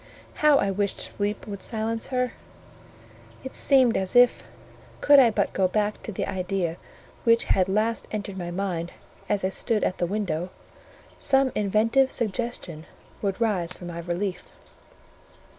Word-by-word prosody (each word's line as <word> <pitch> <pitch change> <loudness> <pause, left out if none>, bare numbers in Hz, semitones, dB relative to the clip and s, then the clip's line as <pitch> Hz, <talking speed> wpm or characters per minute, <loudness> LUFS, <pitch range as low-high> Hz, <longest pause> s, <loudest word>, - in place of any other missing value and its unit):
How 300 -2 +6
I 200 - +1
wished 200 0 -1
sleep 205 +1 -3
would 200 -2 -7
silence 225 +1 -3
her. 250 -1 -1 1.1
It 265 - -8
seemed 260 -4 +4
as 190 +2 -2
if, 245 0 +5 0.6
could 285 -1 +7
I 250 -3 +7
but 205 -2 -1
go 190 -1 +2
back 210 +2 -1
to - - -6
the 190 - -3
idea 185 -3 -2 0.5
which 230 0 +4
had 185 -1 +1
last 220 +4 0
entered 205 -2 -4
my 175 -2 -5
mind 175 -2 -3 0.4
as 205 -2 0
I 190 - +1
stood 215 +2 -1
at 185 - -1
the 175 - +1
window, 185 -4 -2 0.7
some 270 -1 +3
inventive 220 +6 +2
suggestion 215 -9 -3 0.3
would 195 0 -2
rise 190 -7 +1
for 180 - -9
my 170 -1 -6
relief. 180 +2 -4
205 Hz, 150 wpm, -25 LUFS, 185-230 Hz, 1.1 s, could